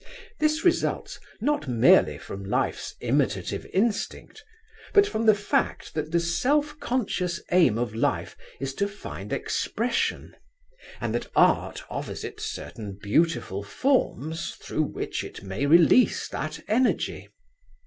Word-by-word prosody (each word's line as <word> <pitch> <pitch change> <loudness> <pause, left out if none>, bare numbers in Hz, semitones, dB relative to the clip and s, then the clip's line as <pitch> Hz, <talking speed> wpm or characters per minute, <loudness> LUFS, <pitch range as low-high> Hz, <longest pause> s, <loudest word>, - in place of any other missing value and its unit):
This 310 +2 +1
results 350 - +1 0.2
not 290 - 0
merely 120 -3 +5
from 100 0 -8
Life's 95 - -2
imitative - - 0
instinct, 220 - -1 0.5
but 405 -1 +8
from 225 - -2
the 215 - +7
fact 205 0 -1
that 155 0 -3
the 170 - +3
self 290 - +1
conscious 190 -8 -1
aim 175 -11 +5
of 120 -2 -2
Life 115 - -1 0.2
is 135 0 -3
to 200 +7 0
find 200 0 -8
expression, - - -1 0.6
and - - -2
that - - -2
Art - - +3
offers - - -5
it 430 - -7
certain 125 - -6
beautiful 105 - +1
forms 160 - -1
through - - -2
which - - -4
it - - -9
may 100 +9 -2
realise 170 - +5
that 155 +1 -5
energy. 240 +5 0
175 Hz, 130 wpm, -26 LUFS, -, 0.6 s, but